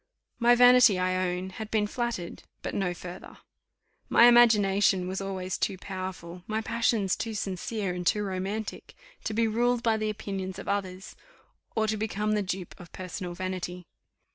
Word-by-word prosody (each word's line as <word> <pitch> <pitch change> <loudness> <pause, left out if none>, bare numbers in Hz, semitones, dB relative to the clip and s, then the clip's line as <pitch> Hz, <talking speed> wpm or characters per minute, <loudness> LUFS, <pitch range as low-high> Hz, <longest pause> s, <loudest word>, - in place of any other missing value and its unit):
My 240 0 +5
vanity, 245 -4 +7
I 185 0 0
own, 180 +1 -4
had 215 +3 -7
been 215 -2 +1
flattered, 230 -5 -4 0.2
but - - -4
no 190 -3 0
further. 175 +1 -9 0.7
My - - +6
imagination 205 -6 +5
was 190 +1 -3
always 190 -2 -4
too 190 - -1
powerful, 185 -2 -7
my 220 0 -1
passions 220 -3 +1
too 225 -1 -4
sincere 195 0 -3
and 180 0 -4
too 210 - +2
romantic, 195 +3 -4 0.3
to 215 - -2
be 230 0 +2
ruled 240 +2 +1
by 225 -1 +2
the 215 0 -1
opinions 195 -3 -5
of - - -8
others, 190 -1 -3 0.6
or 220 - +2
to 215 0 -1
become 210 0 -1
the 210 -1 +2
dupe 185 -2 -4
of 175 -2 -12
personal 180 -1 -6
vanity. 180 -1 -4
195 Hz, 165 wpm, -28 LUFS, 185-220 Hz, 0.7 s, vanity